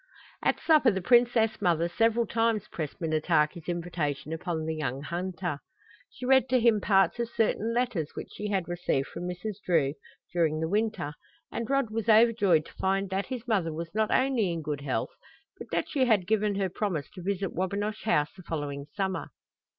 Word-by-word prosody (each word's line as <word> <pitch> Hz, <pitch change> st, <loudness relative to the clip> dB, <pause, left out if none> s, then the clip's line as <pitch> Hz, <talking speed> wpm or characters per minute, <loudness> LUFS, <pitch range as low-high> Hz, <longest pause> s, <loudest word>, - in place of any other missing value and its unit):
At -, -, +1 dB
supper 305 Hz, -6 st, +5 dB
the 190 Hz, -3 st, 0 dB
princess 235 Hz, +2 st, +3 dB
mother 170 Hz, -1 st, +2 dB
several 225 Hz, +6 st, +2 dB
times 225 Hz, -2 st, 0 dB
pressed 155 Hz, 0 st, -5 dB
Minnetaki's 160 Hz, 0 st, +1 dB
invitation 165 Hz, -4 st, -2 dB
upon 160 Hz, -1 st, -3 dB
the 160 Hz, -, -1 dB
young 140 Hz, -3 st, -3 dB
hunter. 175 Hz, -2 st, -3 dB, 0.5 s
She 255 Hz, -, -8 dB
read 265 Hz, 0 st, +4 dB
to 255 Hz, 0 st, +4 dB
him 225 Hz, -3 st, +4 dB
parts 195 Hz, +1 st, +3 dB
of 235 Hz, -1 st, -1 dB
certain 225 Hz, 0 st, 0 dB
letters 235 Hz, -10 st, 0 dB
which -, -, -6 dB
she 210 Hz, -, -4 dB
had 190 Hz, -4 st, 0 dB
received 175 Hz, -6 st, -1 dB
from 175 Hz, -, -5 dB
Mrs. 185 Hz, +3 st, -5 dB
Drew 155 Hz, -6 st, +2 dB, 0.4 s
during 160 Hz, -3 st, +1 dB
the 160 Hz, -, -1 dB
winter, 210 Hz, -6 st, -1 dB, 0.4 s
and 230 Hz, -1 st, -4 dB
Rod 275 Hz, -5 st, +1 dB
was 225 Hz, 0 st, -2 dB
overjoyed 215 Hz, -7 st, +5 dB
to -, -, -14 dB
find 195 Hz, 0 st, 0 dB
that 195 Hz, +1 st, -1 dB
his 250 Hz, -2 st, -6 dB
mother 195 Hz, -8 st, +1 dB
was 165 Hz, +3 st, -6 dB
not 220 Hz, 0 st, +1 dB
only 255 Hz, -8 st, +2 dB
in 165 Hz, -2 st, -4 dB
good 145 Hz, -2 st, -3 dB
health, 130 Hz, -5 st, -2 dB, 0.5 s
but -, -, -8 dB
that -, -, 0 dB
she 285 Hz, -5 st, +1 dB
had 215 Hz, -7 st, +3 dB
given 210 Hz, 0 st, +1 dB
her 195 Hz, -1 st, +1 dB
promise 180 Hz, -6 st, -2 dB
to 185 Hz, -, -10 dB
visit 195 Hz, +1 st, -2 dB
Wabinosh 205 Hz, +4 st, -2 dB
House 150 Hz, -9 st, +2 dB
the 190 Hz, -, -12 dB
following 145 Hz, -4 st, -4 dB
summer. 190 Hz, -2 st, -2 dB
190 Hz, 185 wpm, -28 LUFS, 165-220 Hz, 0.5 s, supper